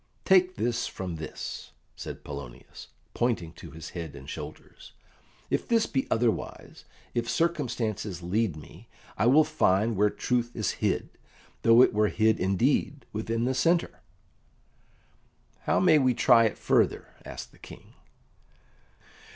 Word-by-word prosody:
"Take 185 -1 +4
this 120 +1 -1
from 90 -3 -5
this," 80 0 -7 0.2
said - - -8
Polonius, 70 -4 -9 0.3
pointing 110 -9 -1
to 85 - -11
his 80 +2 -9
head 85 -4 -6
and 65 - -11
shoulders, - - -9 0.6
"if - - 0
this 230 -2 +3
be 135 -2 -2
otherwise. 115 0 -2 0.3
If 120 -1 -1
circumstances 115 - -1
lead 95 0 0
me, 85 +9 -14 0.3
I 115 - +1
will 145 +5 +6
find 115 -8 +1
where 105 +2 +3
truth 120 +2 -1
is 110 - 0
hid, - - 0 0.5
though 115 +2 +7
it - - +3
were 105 0 +3
hid 110 +1 +2
indeed 120 +9 0
within 115 +2 -2
the 130 - +1
centre." 165 - +1 1.7
"How - - +2
may 155 -4 +5
we 130 -3 +2
try 115 0 +5
it 110 - -1
further?" - - +1
asked - - -8
the - - -22
King. - - -13
115 Hz, 135 wpm, -27 LUFS, 95-130 Hz, 1.7 s, though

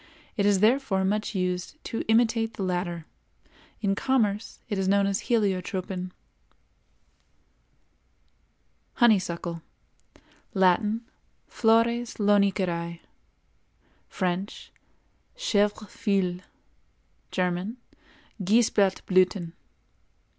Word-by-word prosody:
It 205 -3 +2
is 200 -2 +3
therefore 220 -4 +3
much 210 +2 -1
used 180 +4 -2
to 225 - -3
imitate 225 0 +2
the 200 - -3
latter. 175 -3 -2 0.8
In 200 -2 +1
commerce 215 -2 0
it 205 -3 -2
is 190 - 0
known 200 +1 +3
as 195 0 -1
heliotropin. 190 -4 -1 2.9
HONEYSUCKLE. 175 -7 +2 0.9
Latin—Flores 225 +3 +1
Loniceræ; 190 -5 +1 1.1
French—Chèvre 205 - -3
feuille; 195 -6 0 0.9
German— 185 +5 -1 0.7
Geisblattblüthen. 190 -4 +2
200 Hz, 70 wpm, -26 LUFS, 185-225 Hz, 2.9 s, is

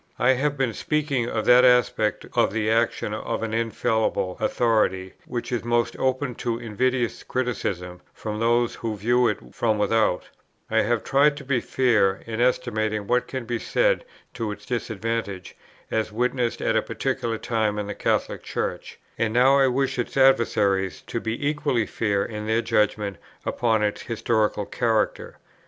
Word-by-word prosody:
I 125 - +4
have 140 +3 0
been 130 -4 0
speaking 140 -5 -1
of 110 - -2
that 125 +1 +7
aspect 125 -4 +3
of - - +3
the 110 +1 0
action 115 -2 +1
of 110 +1 -3
an 110 -1 -3
infallible 110 -4 0
authority, 95 -5 +1
which 120 0 -4
is 120 - -1
most 120 0 0
open 130 0 0
to 115 -2 -1
invidious 120 +2 -1
criticism 90 -8 -3
from 105 -1 -5
those 120 +1 +2
who 110 -2 -4
view 120 +4 +3
it 105 - 0 0.2
from 110 -2 +1
without; 105 -3 +1 0.4
I 110 - +4
have 115 +1 0
tried 145 +2 +3
to 145 - -8
be 130 -2 +1
fair, 110 -7 +2
in 115 0 -3
estimating 110 -4 0
what 125 +4 +1
can 130 -3 -5
be 120 0 -2
said - - +1 0.3
to 115 -3 -3
its 105 0 -9
disadvantage, 115 -4 -3 0.4
as 110 -1 -1
witnessed 125 +1 -1
at - - +1
a - - +4
particular 115 -1 -2
time 110 -2 -1
in 105 - -2
the 105 - -4
Catholic - - -1
Church, - - -4 0.2
and 115 -1 +1
now 130 +4 +5
I 135 - +5
wish 130 0 0
its 120 - -3
adversaries 100 -8 +3
to 115 - -3
be 115 +6 -2
equally 145 -6 0
fair 100 -3 0
in 105 -1 -6
their 110 +1 +1
judgment 105 -3 0 0.3
upon 110 -3 +1
its 105 -1 -1
historical 110 -2 0
character. 115 -1 -1
115 Hz, 165 wpm, -24 LUFS, 105-125 Hz, 0.4 s, that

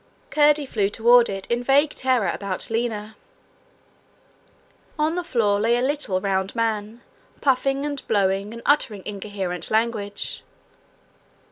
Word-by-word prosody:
Curdie 295 -1 +4
flew 205 -6 0
toward 235 +3 +5
it 195 -1 -5
in 235 +1 -1
vague 280 +4 +3
terror 255 -7 +1
about 200 +1 -3
Lina. 220 -2 -2 1.8
On 310 +1 +1
the 355 +1 -2
floor 215 -10 +1
lay 230 +3 +2
a - - 0
little 265 -9 0
round 190 +1 -1
man, 225 0 -2 0.4
puffing 275 +1 +1
and 285 -2 -4
blowing, 195 -1 +1
and 235 0 -9
uttering 235 -9 +1
incoherent 195 -4 -4
language. 220 -2 -2
225 Hz, 125 wpm, -23 LUFS, 200-265 Hz, 1.8 s, toward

